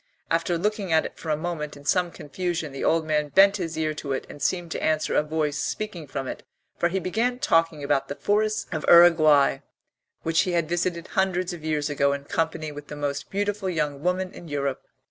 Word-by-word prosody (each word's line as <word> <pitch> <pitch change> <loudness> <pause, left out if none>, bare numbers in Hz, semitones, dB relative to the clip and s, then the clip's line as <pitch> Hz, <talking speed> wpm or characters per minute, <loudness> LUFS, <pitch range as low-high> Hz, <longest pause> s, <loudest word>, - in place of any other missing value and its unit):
After 165 +1 +1
looking 205 0 -1
at 160 0 +4
it - - -8
for 160 - -6
a 150 - +1
moment 155 -3 -4
in 140 - -15
some 180 +3 +2
confusion 165 0 -4
the 135 - -5
old 165 -1 +2
man 150 -1 +1
bent 195 +4 +6
his 165 -4 -4
ear 155 -1 0
to 145 -2 -4
it 130 - -3
and 145 - -11
seemed 175 +2 -1
to - - -3
answer 155 -1 +1
a - - +4
voice 150 -1 -1
speaking 190 -8 -4
from 135 0 -4
it, - - -6 0.3
for 170 - +1
he 190 - -1
began 230 +7 0
talking 165 - +1
about 140 -1 +1
the 140 - -5
forests 215 +4 0
of 155 -3 -3
Uruguay 160 -4 +6 0.6
which 165 0 +1
he 180 - -1
had 170 -2 +1
visited 175 0 -2
hundreds 185 -1 0
of 165 -3 -9
years 155 -2 0
ago 140 -1 +1
in 140 0 -4
company 160 0 -2
with 145 0 -9
the 150 - -7
most 145 -1 -3
beautiful 205 0 -1
young 150 -5 -2
woman 185 +2 -1
in 175 - -11
Europe. 140 -3 -2
165 Hz, 215 wpm, -25 LUFS, 150-180 Hz, 0.6 s, bent